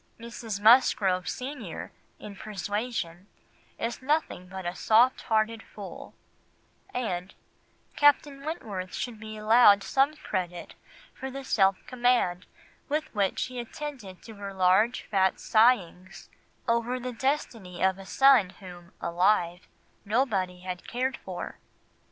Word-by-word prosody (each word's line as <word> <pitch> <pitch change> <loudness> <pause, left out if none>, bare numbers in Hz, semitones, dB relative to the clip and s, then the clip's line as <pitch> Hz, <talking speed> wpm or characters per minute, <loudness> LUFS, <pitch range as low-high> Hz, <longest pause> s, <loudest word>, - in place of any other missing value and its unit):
Mrs. 230 -3 -6
Musgrove 205 -5 +4
senior, 250 - -6 0.3
in 205 -1 -10
Persuasion, 205 -2 -4 0.5
is 235 +3 -3
nothing 290 - -1
but 190 0 -8
a 175 - -2
soft 230 +7 +3
hearted 220 -1 0
fool, 205 -3 -10 0.8
and 185 - -3 0.6
"Captain 290 -1 +3
Wentworth 205 - -5
should 235 -3 -4
be 215 0 -8
allowed 215 -2 +6
some 275 +3 +2
credit 180 - -4 0.4
for 265 - -6
the 275 +1 -7
self 195 -6 +3
command 240 -8 +1 0.4
with 305 +1 -2
which 200 -3 0
he 255 -1 -7
attended 240 - -7
to 225 - -10
her 200 -1 -7
large 190 +6 +3
fat 190 -2 +1
sighings 195 -5 +1 0.4
over 235 +2 0
the 250 0 -5
destiny 230 -9 -2
of 190 0 +2
a 195 - -10
son 270 -8 +5
whom, 175 -2 -12
alive, 180 0 +1 0.4
nobody 200 -6 0
had 180 -1 -6
cared 260 +2 -1
for." - - -7
215 Hz, 120 wpm, -28 LUFS, 185-250 Hz, 0.8 s, allowed